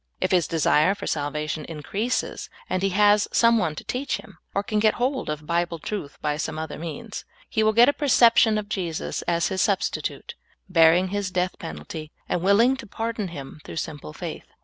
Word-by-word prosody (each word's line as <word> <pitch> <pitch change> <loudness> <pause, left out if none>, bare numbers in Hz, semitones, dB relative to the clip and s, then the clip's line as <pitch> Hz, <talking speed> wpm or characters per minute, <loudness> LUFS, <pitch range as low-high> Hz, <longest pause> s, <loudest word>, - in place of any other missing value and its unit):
If 185 - 0
his 175 -5 +3
desire 160 +3 +3
for - - -7
salvation 150 +1 -2
increases, 200 +10 -3 0.2
and 185 - -1
he 195 - +2
has 205 +1 +4
some 230 -1 +4
one 160 -6 -1
to - - -7
teach 265 +3 -2
him, 195 -6 -14 0.2
or 200 - +1
can 210 +1 0
get 215 0 +3
hold 260 - -1
of 150 0 -4
Bible 170 +1 0
truth 160 -3 -5
b}^ 150 0 0
some - - -4
other 160 -1 -5
means, 170 +7 -6 0.2
he 220 - 0
will 215 0 +4
get 235 +3 +6
a 285 - +4
perception 235 -6 +5
of 210 -1 -3
Jesus 175 -6 -3
as 170 -1 +1
his 190 -1 -1
substitute, 200 -2 -1 0.3
bearing 175 +1 +5
his 200 -1 -2
death 185 0 -1
penalt)^, 80 - -7 0.2
and 175 - -1
willing 215 +8 +4
to 260 - -9
pardon 225 0 -3
him 145 -4 -9
through - - -9
simple 145 - -5
faith. - - -7
185 Hz, 195 wpm, -24 LUFS, 160-215 Hz, 0.3 s, get